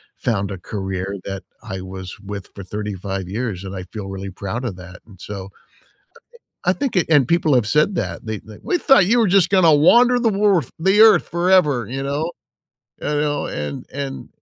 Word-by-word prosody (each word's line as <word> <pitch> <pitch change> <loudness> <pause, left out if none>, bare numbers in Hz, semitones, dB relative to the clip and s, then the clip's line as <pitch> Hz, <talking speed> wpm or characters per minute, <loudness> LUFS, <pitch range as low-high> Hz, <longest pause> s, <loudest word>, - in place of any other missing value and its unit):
found 100 -4 -1
a 95 - -5
career 95 -1 -4
that 95 0 -6 0.2
I 100 -5 -6
was 95 0 -8
with 100 -1 -7
for 100 - -8
35 95 -1 -5
years 105 -3 -3
and 95 0 -7
I 90 - -5
feel 100 +1 -8
really 95 0 -6
proud 105 +7 -5
of 105 -6 -3
that, 90 0 -12
and 100 -5 -17
so 100 -2 -7 1.2
I - - +5
think 275 -8 -3
it 175 - +3
and 145 -5 +4
people 165 -4 +3
have 120 -4 +3
said 150 - +2
that, - - -3
they 110 -2 -4
like, 110 -1 -13
"We 355 - 0
thought 270 - +5
you 235 +5 +3
were 230 - +4
just 180 -2 +4
gonna 180 -6 +5
wander 240 +11 +5
the 235 -2 +2
world 200 -4 +2
the 190 +5 +3
Earth 220 -2 +6
forever, 170 - +2
you 135 +3 -4
know?" 145 +4 -2 0.7
You - - -5
know? 145 -1 -1
And 75 -1 -5
and, 135 -1 -5
115 Hz, 195 wpm, -20 LUFS, -, 1.2 s, Earth